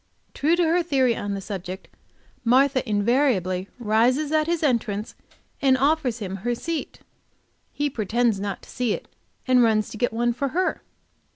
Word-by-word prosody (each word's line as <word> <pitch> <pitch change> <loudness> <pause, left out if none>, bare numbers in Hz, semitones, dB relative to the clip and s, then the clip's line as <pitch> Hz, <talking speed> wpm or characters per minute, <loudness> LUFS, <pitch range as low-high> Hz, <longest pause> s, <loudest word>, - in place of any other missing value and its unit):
True 315 +4 +2
to 350 - +2
her 335 +2 +3
theory 265 -7 +2
on 205 -1 -3
the 195 - -5
subject, 190 -1 -6 0.6
Martha 260 +3 +4
invariably 205 -4 +1
rises 245 +6 +2
at 310 0 +2
his 340 -1 -1
entrance, 230 -6 0 0.5
and 265 -2 +4
offers 275 -3 +1
him 195 -4 -5
her 240 +5 -2
seat! 330 +5 -5 0.7
He 290 - -1
pretends 235 -3 0
not 200 0 -4
to - - -15
see 245 -4 0
it, - - -6 0.4
and 255 -1 +5
runs 220 -2 +2
to - - -8
get 245 - 0
one 240 +1 0
for 275 +4 -2
her! 365 +7 -1
245 Hz, 165 wpm, -24 LUFS, 210-280 Hz, 0.7 s, and